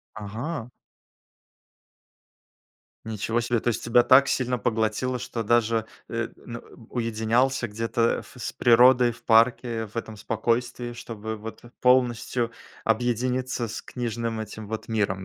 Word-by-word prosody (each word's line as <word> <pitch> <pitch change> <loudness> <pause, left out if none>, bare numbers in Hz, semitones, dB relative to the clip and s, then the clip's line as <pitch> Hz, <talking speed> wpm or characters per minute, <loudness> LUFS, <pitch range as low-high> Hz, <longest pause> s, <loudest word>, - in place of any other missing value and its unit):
Ага! 115 +6 -5 2.4
Ничего 110 +1 -1
себе! 120 -1 0
То - - -1
есть 120 - -1
тебя 120 +1 +5
так 130 +3 +6
сильно 125 -1 0
поглотило, 115 +3 0
что 120 -1 -4
даже 115 0 +2 0.2
э, 115 0 -2
на 115 -1 -8 0.3
уединялся 120 +2 +1
где-то 115 +2 0
ф - - -15
с 125 - -5
природой 125 0 +5
в 115 +1 -16
парке, 115 0 +3
в 105 - -17
этом 110 -2 -4
спокойствии, 120 +3 -1
чтобы 110 -2 -6
вот 110 +1 -9 0.2
полностью 125 -1 +2 0.3
объединиться 125 +2 0
с - - -6
книжным 115 -2 -3
этим 110 0 -7
вот 110 +2 -5
миром, 100 -4 -1
115 Hz, 125 wpm, -25 LUFS, 110-125 Hz, 2.4 s, так